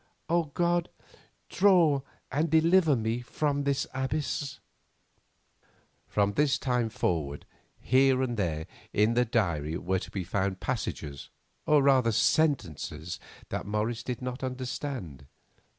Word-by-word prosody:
O 170 0 +2
God, 175 +3 0 0.6
draw 175 -8 +4 0.3
and 150 +4 +1
deliver 160 0 +4
me 115 +1 -1
from 145 +3 -1
this 140 -1 +1
abyss." 140 +1 -2 1.5
From 100 -1 +1
this 145 +4 +2
time 125 -3 0
forward 80 -9 -2 0.3
here 130 0 +3
and 120 -2 -1
there 80 -7 -1 0.3
in 105 +3 +3
the 125 +1 +3
diary 85 -9 0
were 95 +1 -1
to - - -8
be 95 - -3
found 95 +1 -1
passages, 75 - -4 0.4
or 150 -2 +5
rather 130 -4 +4
sentences, 95 - 0 0.3
that - - -4
Morris 110 +3 -1
did 125 +1 -5
not 125 +1 -4
understand. 125 - -5
125 Hz, 120 wpm, -29 LUFS, 100-145 Hz, 1.5 s, or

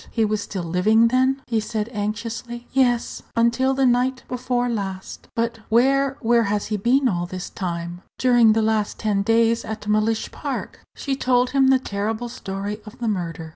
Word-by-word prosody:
he 225 -2 +1
was 210 0 -1
still 190 -3 -5
living, 215 +7 +3
then?" 260 +2 +2
he 230 -2 0
said, 215 0 -3
anxiously. 230 +3 -4
"Yes; 245 -3 +1
until 235 +3 +2
the 270 0 +2
night 250 +1 +1
before 250 0 -1
last?" 195 -5 -5
"But 230 0 -1
where 270 +4 +3
where 235 0 +3
has 205 0 -1
he 210 - -2
been 255 +6 +2
all 175 -5 -1
this 185 +1 -6
time?" 175 -1 -4 0.2
"During 240 -3 +5
the 220 0 +1
last 215 -1 0
ten 210 -2 0
days 230 +2 +2
at 215 -1 -6
Mellish 215 +1 +1
Park." - - -5 0.2
She 275 -2 -2
told 250 -1 +2
him 275 -1 +4
the 265 0 +5
terrible 220 0 -3
story 200 -1 -5
of 210 0 -12
the 235 - -3
murder. 165 -6 -3
225 Hz, 175 wpm, -22 LUFS, 205-245 Hz, 0.2 s, During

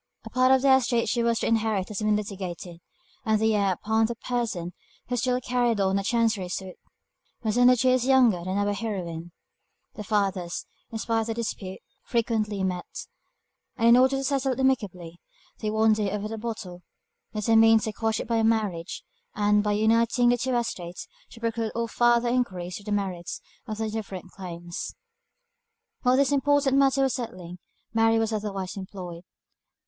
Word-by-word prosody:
A - - -9
part 255 0 +4
of 265 0 +4
the 270 -1 +7
estate 240 -2 +1
she 240 - +1
was 235 0 +2
to - - 0
inherit 220 -4 +1
had 210 - -4
been 215 -1 +2
litigated, 185 -4 -5 0.4
and 220 -3 +2
the 220 0 +2
heir 200 -2 +2
of 220 +1 +3
the 235 - -4
person 225 -8 -3 0.4
who 250 - 0
still 250 +1 +1
carried 245 -3 0
on 195 0 +2
a - - -3
Chancery 225 -4 +1
suit, 185 0 -5 0.7
was 215 -1 0
only 245 +1 +6
two 255 +2 +2
years 255 0 +2
younger 245 -10 +4
than 185 +2 -2
our 205 0 +1
heroine. 175 -6 -4 0.6
The 210 - -7
fathers, 195 -4 -1 0.3
spite 225 0 0
of 220 - -4
the 225 - -1
dispute, 200 -5 -5 0.2
frequently 215 -4 -1
met, 180 -1 -4 0.7
and, 230 +1 +4
in 235 - +8
order 260 +2 +4
to 270 - -3
settle 270 -1 0
it 255 - -7
amicably, 185 -10 -1 0.4
they 215 - -2
one 220 +1 +3
day, 210 -2 0
over 210 +2 -3
a - - -4
bottle, 210 -6 -6 0.5
determined 225 +1 +5
to 220 -2 -3
quash 220 +1 -1
it - - -5
by 230 0 +1
a 225 - +2
marriage, 210 -6 -1 0.3
and, 210 0 +3
by 210 0 +1
uniting 230 +3 +3
the 245 - +3
two 255 +1 -1
estates, 180 -7 -4 0.2
to 230 - -13
preclude 230 -1 -2
all 235 0 -1
farther 240 +1 +3
enquiries 185 -8 -2
into 205 - -9
the 205 - +1
merits 185 -4 -3 0.3
of 215 -1 -4
their 220 -1 -2
different 195 -4 -6
claims. 175 -2 -7 1.1
While 250 0 +3
this 280 0 +3
important 285 -1 +3
matter 275 0 +3
was 265 - +1
settling, 180 -8 -6 0.3
Mary 225 0 +4
was 225 0 0
otherwise 195 -3 -3
employed. 185 -3 -7
220 Hz, 180 wpm, -26 LUFS, 195-235 Hz, 1.1 s, in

